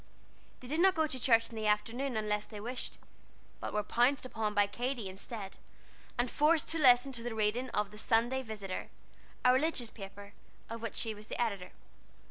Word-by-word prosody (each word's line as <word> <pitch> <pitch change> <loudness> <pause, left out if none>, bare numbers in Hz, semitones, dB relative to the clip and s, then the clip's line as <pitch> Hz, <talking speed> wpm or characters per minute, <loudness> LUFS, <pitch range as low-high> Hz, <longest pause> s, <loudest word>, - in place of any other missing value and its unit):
They 250 - -9
did 305 +5 -1
not 380 +1 +6
go 320 -1 +3
to 265 -4 -3
church 230 -2 +4
in - - -9
the 215 -1 -1
afternoon 225 +5 0
unless 210 -1 0
they 210 - -9
wished, 245 +4 -4 0.6
but - - -4
were 210 - 0
pounced 245 +6 +2
upon 220 -4 -2
by 205 0 +5
Katy 240 +1 -3
instead, 195 +1 -7 0.6
and 245 0 +1
forced 310 +2 +3
to 325 - 0
listen 255 -1 +6
to 240 -3 -5
the 235 -1 -4
reading 220 +4 0
of 210 -3 -1
The 210 - -9
Sunday 235 +4 +2
Visitor, 210 -6 -5 0.6
a 250 - +8
religious 260 -4 0
paper, 200 0 -10 0.4
of 230 0 -5
which 230 - -4
she 225 -2 0
was 210 0 -11
the - - -5
editor. 200 -6 -1
230 Hz, 190 wpm, -33 LUFS, 210-255 Hz, 0.6 s, a